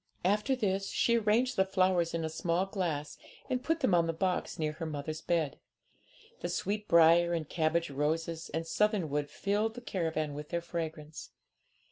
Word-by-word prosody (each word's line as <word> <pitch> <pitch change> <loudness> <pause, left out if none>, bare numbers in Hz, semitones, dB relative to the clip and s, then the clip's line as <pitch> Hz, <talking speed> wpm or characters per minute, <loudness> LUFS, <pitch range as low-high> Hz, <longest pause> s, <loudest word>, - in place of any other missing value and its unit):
After 210 +7 +2
this 195 -5 -1
she 235 - +2
arranged 230 +4 +2
the 190 - +5
flowers 185 -3 +1
in 165 -1 -1
a - - -2
small 170 +3 0
glass, 170 -7 -3 0.3
and 250 0 0
put 325 0 0
them 260 -9 +2
on 170 -1 +4
the 165 - 0
box 180 +2 -1
near 155 -1 -1
her 165 +2 -6
mother's 155 +1 -4
bed. 160 -5 0 0.8
The 175 - -3
sweet 205 +4 -2
briar 170 +1 +6
and 160 -3 -2
cabbage 165 0 0
roses 160 +3 -2
and 165 +1 -3
southernwood 165 -7 0
filled 210 +3 -1
the 245 - -7
caravan 160 -8 -2
with 150 +1 -7
their 170 - -1
fragrance. 160 -3 -6
170 Hz, 170 wpm, -31 LUFS, 160-195 Hz, 0.8 s, briar